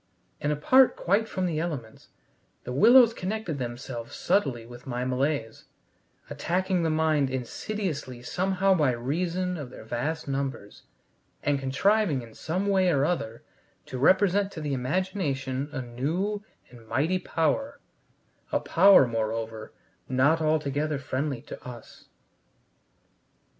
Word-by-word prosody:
And, 145 Hz, -, -1 dB
apart 255 Hz, -, +5 dB
quite 205 Hz, +5 st, +1 dB
from 185 Hz, -1 st, -2 dB
the 165 Hz, -3 st, -1 dB
elements, 145 Hz, -10 st, -5 dB, 0.6 s
the 125 Hz, -, -5 dB
willows 235 Hz, -, +7 dB
connected 185 Hz, -7 st, -3 dB
themselves 120 Hz, -1 st, -6 dB
subtly 130 Hz, -, 0 dB
with 120 Hz, +3 st, -12 dB
my 125 Hz, 0 st, -2 dB
malaise, 130 Hz, -3 st, -1 dB, 0.6 s
attacking 185 Hz, +1 st, -1 dB
the 165 Hz, -, +1 dB
mind 155 Hz, -3 st, +2 dB
insidiously 130 Hz, -, -4 dB
somehow 190 Hz, +5 st, +1 dB
by 150 Hz, -8 st, +2 dB
reason 175 Hz, +9 st, -2 dB
of 145 Hz, -5 st, -6 dB
their 125 Hz, -, -11 dB
vast 125 Hz, +9 st, -3 dB
numbers, 135 Hz, -6 st, -4 dB, 0.6 s
and 145 Hz, -1 st, +1 dB
contriving 145 Hz, -, +1 dB
in 115 Hz, -1 st, -13 dB
some 180 Hz, -, -2 dB
way 190 Hz, -2 st, +3 dB
or 140 Hz, -4 st, +2 dB
other 115 Hz, -10 st, -2 dB, 0.4 s
to 130 Hz, -, -6 dB
represent 195 Hz, +5 st, +3 dB
to -, -, -6 dB
the 145 Hz, -2 st, -2 dB
imagination 140 Hz, -2 st, -2 dB
a 130 Hz, -3 st, -4 dB
new 165 Hz, -, -2 dB, 0.3 s
and 115 Hz, -2 st, -15 dB
mighty 160 Hz, +10 st, +1 dB
power, 175 Hz, -, -1 dB, 0.7 s
a -, -, +2 dB
power, 190 Hz, -4 st, +6 dB
moreover, 110 Hz, -1 st, -3 dB, 0.4 s
not 140 Hz, +5 st, +3 dB
altogether 155 Hz, -1 st, 0 dB
friendly 135 Hz, -1 st, -3 dB
to -, -, -10 dB
us. 120 Hz, -2 st, -11 dB
145 Hz, 125 wpm, -27 LUFS, 130-185 Hz, 0.7 s, willows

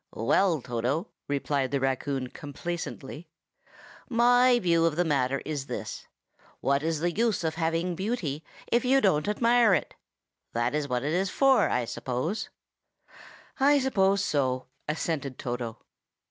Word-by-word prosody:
"Well, 170 Hz, -9 st, +2 dB
Toto," 125 Hz, -, -2 dB, 0.2 s
replied 140 Hz, -1 st, -1 dB
the 140 Hz, +1 st, 0 dB
raccoon 135 Hz, 0 st, -1 dB
complacently, 150 Hz, +1 st, -6 dB, 0.8 s
"my 245 Hz, +1 st, +5 dB
view 170 Hz, -6 st, +2 dB
of 165 Hz, -2 st, +1 dB
the 175 Hz, +2 st, +1 dB
matter 135 Hz, -3 st, 0 dB
is 145 Hz, -3 st, -4 dB
this: -, -, -6 dB, 0.5 s
what 140 Hz, +1 st, +1 dB
is 160 Hz, -1 st, -1 dB
the 175 Hz, +1 st, +1 dB
use 225 Hz, 0 st, 0 dB
of 160 Hz, -1 st, 0 dB
having 165 Hz, +2 st, -1 dB
beauty 175 Hz, -, -3 dB, 0.3 s
if 235 Hz, -, +3 dB
you 265 Hz, +2 st, +4 dB
don't 185 Hz, -, +2 dB
admire 230 Hz, 0 st, +4 dB
it? -, -, -3 dB, 0.6 s
That 120 Hz, +2 st, 0 dB
is 150 Hz, -1 st, -1 dB
what 125 Hz, -1 st, -1 dB
it's 180 Hz, +6 st, 0 dB
for, 270 Hz, +5 st, +4 dB
I 125 Hz, -, 0 dB
suppose." 130 Hz, -, -3 dB, 1.1 s
"I 285 Hz, +2 st, +5 dB
suppose 200 Hz, -7 st, +2 dB
so," 130 Hz, -6 st, 0 dB, 0.2 s
assented 150 Hz, -4 st, -2 dB
Toto. 120 Hz, -2 st, -4 dB
160 Hz, 135 wpm, -27 LUFS, 135-200 Hz, 1.1 s, my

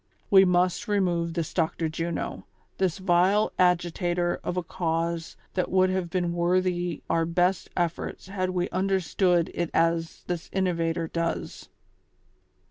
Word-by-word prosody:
We 190 Hz, -1 st, +8 dB
must 180 Hz, +4 st, +1 dB
remove 175 Hz, -5 st, 0 dB
this 165 Hz, -3 st, -3 dB
Dr. 165 Hz, -1 st, 0 dB
Juno; 165 Hz, +2 st, -4 dB, 0.3 s
this 185 Hz, -3 st, +1 dB
vile 190 Hz, +3 st, +3 dB
agitator 175 Hz, 0 st, +1 dB
of 180 Hz, -, -3 dB
a 180 Hz, -, 0 dB
cause 165 Hz, -1 st, -2 dB, 0.2 s
that 185 Hz, -, -1 dB
would 185 Hz, 0 st, +3 dB
have 185 Hz, -2 st, -1 dB
been 175 Hz, -1 st, -1 dB
worthy 175 Hz, -1 st, 0 dB
our 165 Hz, 0 st, +2 dB
best 175 Hz, +2 st, +1 dB
efforts 175 Hz, +1 st, -2 dB
had 185 Hz, -1 st, -2 dB
we 180 Hz, 0 st, 0 dB
understood 185 Hz, -2 st, +1 dB
it 170 Hz, -1 st, -2 dB
as 165 Hz, 0 st, +1 dB
this 175 Hz, -2 st, -4 dB
innovator 170 Hz, -3 st, 0 dB
does." 170 Hz, +1 st, -3 dB
175 Hz, 130 wpm, -26 LUFS, 170-185 Hz, 0.3 s, We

